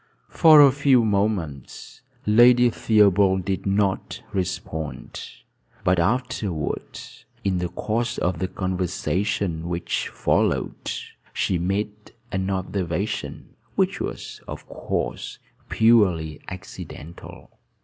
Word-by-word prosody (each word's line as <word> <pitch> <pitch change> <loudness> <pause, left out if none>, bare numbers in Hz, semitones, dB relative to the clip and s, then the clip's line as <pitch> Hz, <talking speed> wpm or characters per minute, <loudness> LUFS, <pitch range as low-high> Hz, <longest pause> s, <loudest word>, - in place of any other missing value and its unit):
For 155 -3 +8
a 140 -2 +8
few 135 -4 +3
moments 100 - -2 0.2
Lady 120 +3 +6
Theobald 100 -4 +3
did 95 +1 -2
not 100 -1 0
respond; 85 -4 -4 0.6
but 90 -1 +3
afterward, 105 - -2 0.4
in 95 -2 0
the 90 0 -2
course 115 +5 -2
of 90 -2 -1
the 95 - -1
conversation 95 -1 -2
which 85 0 -2
followed, - - 0 0.4
she 90 - 0
made 100 +4 -1 0.4
an 95 +1 -1
observation 95 0 -3 0.3
which - - +1
was, - - -6
of - - -8
course, - - -4 0.3
purely 95 -10 +3
incidental. 90 -3 -10
95 Hz, 100 wpm, -24 LUFS, 90-110 Hz, 0.6 s, For